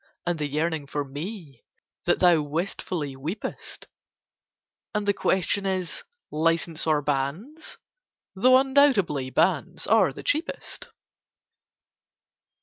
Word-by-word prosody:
And 175 -2 0
the 150 - 0
yearning 155 0 -1
for 145 0 -2
ME 150 - -7 0.4
That - - +3
thou 175 -3 +5
wistfully 155 -1 -3
weepest! 155 +10 -5 1.1
And 210 -1 -1
the 200 - +4
question 195 +1 +1
is 185 - -2 0.3
'License 165 +1 +1
or 150 -2 +2
Banns?', 150 - -3 0.6
though 255 +7 +6
undoubtedly 260 - +3
Banns - - +1
are - - +4
the - - -9
cheapest." 335 -9 -2
170 Hz, 105 wpm, -26 LUFS, 145-200 Hz, 1.1 s, though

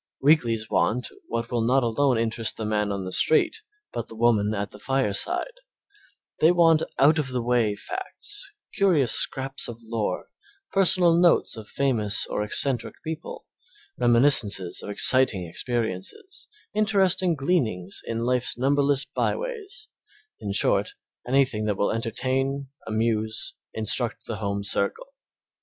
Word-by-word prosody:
Weeklies 120 -7 +2
want 120 +3 0 0.2
what 115 0 -3
will 120 -1 0
not 125 +3 +3
alone 125 +2 +2
interest 115 0 0
the 110 - -4
man 105 -1 0
on 100 -2 -3
the 95 - -5
street, 160 - +2 0.3
but 115 - -4
the 115 - -11
woman 110 -2 +2
at 100 0 -3
the 105 - -13
fireside; 135 - 0 0.9
they 160 - +6
want 165 -3 +4 0.2
out 155 +4 +5
of 150 - -1
the 125 -2 -2
way 120 -3 +1
facts, 410 - -6 0.2
curious 165 - +2
scraps 135 +1 -1
of 120 - -7
lore, 115 -1 -3 0.4
personal 180 -3 +4
notes 175 -5 +3
of 110 -2 -9
famous 115 -7 0
or - - -3
eccentric 120 +3 +1
people, 160 +1 -6 0.5
reminiscences 120 -7 +2
of - - -8
exciting 105 -2 +3
experiences, 115 - -4 0.3
interesting 195 -4 +2
gleanings 120 - -1
in 115 0 -3
life's 125 -1 0
numberless 140 +1 +2
by - - -1
ways, 435 -4 -6 0.5
in - - -4
short, - - +2 0.3
anything 130 -4 +2
that 105 -2 -1
will 100 - +1
entertain, 135 +4 -2 0.2
amuse, 110 0 -1 0.2
instruct 110 -2 -1
the - - -4
home 100 0 -3
circle. - - -2
125 Hz, 135 wpm, -25 LUFS, 110-155 Hz, 0.9 s, they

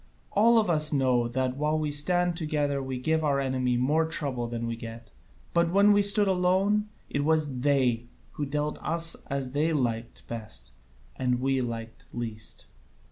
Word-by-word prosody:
All 230 +3 +5
of 220 - +3
us 155 -3 +2
know 130 -4 +2
that 130 +1 -2
while 150 +2 +1
we 155 -1 -1
stand 175 +4 +2
together 150 -3 -1
we 130 -1 -4
give 160 +5 0
our 140 -2 +2
enemy 130 -2 0
more 150 +6 +2
trouble 135 -7 -2
than 115 0 -4
we 115 0 -3
get: 115 0 -10 0.4
but 170 0 +3
when 200 +3 +5
we 205 - +4
stood 205 0 +5
alone 190 +3 +2 0.2
it 145 - -2
was 150 -4 +1
they 125 -4 +1 0.2
who 145 - -4
dealt 150 +1 -2
with - - -17
us 165 0 +1
as 135 -2 -3
they 155 +4 +1
liked 120 -5 -2
best 110 -2 -6 0.5
and 125 -1 0
we 135 0 +1
liked 115 -2 -6
least." 115 -2 -5
145 Hz, 175 wpm, -27 LUFS, 125-160 Hz, 0.5 s, All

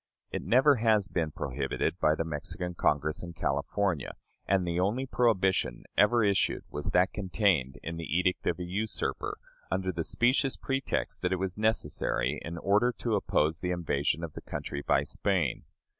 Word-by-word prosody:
It - - -3
never 135 +3 +4
has 110 -3 +3
been 80 -3 -1
prohibited 70 +5 -2
by 75 0 +3
the 80 - -1
Mexican 80 +3 -4
Congress 75 -2 +1
in 85 -1 -7
California; 75 +2 -1 0.3
and 95 -2 +2
the 85 0 -1
only 105 +8 +1
prohibition 95 - +1
ever 115 +3 +4
issued 100 -2 +1
was 75 - -4
that 90 +1 +3
contained 95 - +1
in 85 0 -4
the 80 -1 -2
edict 90 0 0
of 85 - +1
a 90 - -4
usurper, 100 +5 -2 0.3
under 95 0 0
the 85 -2 -3
specious 125 - +2
pretext 135 0 -2
that 90 - 0
it - - +3
was 95 0 -2
necessary, 105 - 0
in 85 +1 -6
order 105 +7 +3
to 115 - -1
oppose 80 -5 +1
the 90 - -2
invasion 85 -2 0
of 80 -3 -5
the - - -8
country 70 - -5
by - - +2
Spain. 95 -6 0
90 Hz, 170 wpm, -29 LUFS, 80-105 Hz, 0.3 s, never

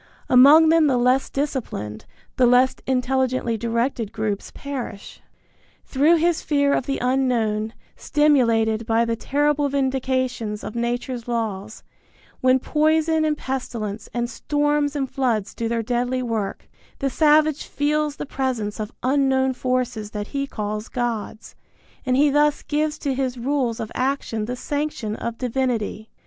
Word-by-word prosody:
Among 290 +6 +8
them 325 -1 +5
the 260 -3 +2
less 250 +2 +2
disciplined, 225 - -4 0.3
the 250 - +4
less 255 +2 +4
intelligently 255 -2 0
directed 230 0 -1
groups 215 -2 -3
perish. 255 -7 -7 0.6
Through 295 +5 +3
his 335 0 +1
fear 285 -2 +2
of - - -1
the 275 - -1
unknown, 235 -4 0 0.2
stimulated 230 -7 +2
by 230 0 +2
the 230 0 -1
terrible 290 +3 +1
vindications 260 -5 -1
of - - -6
nature's 240 +1 -3
laws, 220 -3 -3 0.6
when 255 0 +4
poison 315 +3 +2
and 305 -1 +1
pestilence 225 -6 -4
and 240 0 -1
storms 290 +3 0
and 275 -2 -1
floods 240 -6 -1
do 230 - -3
their 230 -1 -1
deadly 245 +2 -1
work, 220 -5 -3 0.3
the 275 -2 -1
savage 305 0 +3
feels 295 0 0
the - - -5
presence 255 -7 -3
of 215 0 -4
unknown 265 0 +2
forces 250 -4 -2
that 210 -1 -5
he 275 0 -2
calls 210 -2 -4
gods, 235 -3 -4 0.5
and 255 0 +2
he 290 +1 +4
thus 295 +1 +2
gives 305 +1 -1
to 280 -2 -2
his 260 -1 -2
rules 250 -2 -1
of 220 - -5
action 255 -5 -1
the 245 +3 -4
sanction 285 -6 -3
of 235 -1 -4
divinity. 240 -4 -2
255 Hz, 140 wpm, -22 LUFS, 230-285 Hz, 0.6 s, Among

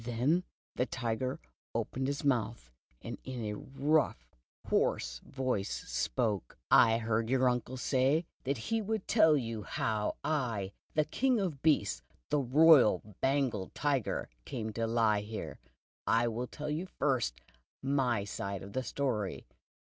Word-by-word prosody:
Then 130 +10 +1 0.3
the 125 - 0
Tiger 120 +2 -2 0.4
opened 130 +1 -1
his 140 0 -2
mouth, 115 - 0 0.3
and - - -6
in 125 -4 -5
a 105 - -2
rough, 135 - 0 0.4
hoarse - - +1
voice 130 - -2 0.2
spoke: 100 - -1
"I 115 -1 +7
heard 115 0 0
your 130 0 +3
uncle 125 +1 -1
say 135 +6 +2 0.2
that 140 +1 -1
he 225 - -1
would 215 -1 -2
tell 155 -2 +5
you 115 -4 -3
how 105 0 -1
I, 120 -11 -1 0.2
the 155 -1 +3
king 250 - +1
of 170 -9 -2
beasts, 145 -11 +2 0.3
the 150 - +3
Royal 130 - +5
Bengal 130 -8 +1
Tiger 140 -6 0 0.2
came 110 - -4
to 115 +1 -1
lie 110 -2 +2
here. 105 -9 -6 0.5
I 115 +1 +3
will 120 +2 -2
tell 150 +3 -5
you 165 +5 -2
first 130 - 0 0.5
my 130 -6 +1
side 100 -1 -4
of 100 - -10
the 130 - 0
story. 120 -8 -2
125 Hz, 140 wpm, -32 LUFS, 110-140 Hz, 0.5 s, I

